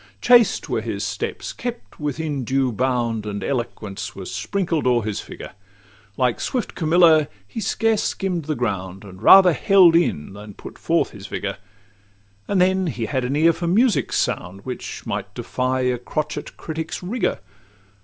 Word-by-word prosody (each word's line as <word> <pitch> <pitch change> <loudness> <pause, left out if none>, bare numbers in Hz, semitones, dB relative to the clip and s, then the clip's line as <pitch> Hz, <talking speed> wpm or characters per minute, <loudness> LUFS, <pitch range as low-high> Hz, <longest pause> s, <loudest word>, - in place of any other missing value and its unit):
Chaste 235 -5 +4
were - - -1
his - - -4
steps, - - -4
each - - -16
kept 240 -1 -6
within 150 -1 -3
due 130 +1 +1
bound, 120 -2 -1
And 100 -1 -4
elegance 110 -6 -4
was 95 -2 -7
sprinkled 170 -8 -1
o'er 120 -2 +3
his 105 -2 -3
figure; - - -9 0.7
Like 125 -2 +1
swift 250 -5 -2
Camilla, 160 -2 +4 0.2
he 225 - -6
scarce 220 +2 +1
skimm'd 180 -5 -2
the 155 0 -1
ground, 95 -5 -3
And 95 -1 -12
rather 185 - +8
held 180 +3 +5
in 95 - +1
than 105 0 -10
put - - -11
forth - - +1
his - - -10
vigour; - - -4 0.9
And 200 - +1
then 190 0 +3
he 120 -7 -3
had 130 +1 -1
an 130 +3 -1
ear 165 +3 +4
for 170 +1 -4
music's 220 +6 +2
sound, 90 +2 -2
Which 130 -1 -6
might - - -4
defy 130 0 -1
a 125 -1 0
crotchet 155 +5 -4
critic's 160 +2 -5
rigour. 215 - -1
145 Hz, 165 wpm, -22 LUFS, 115-180 Hz, 0.9 s, rather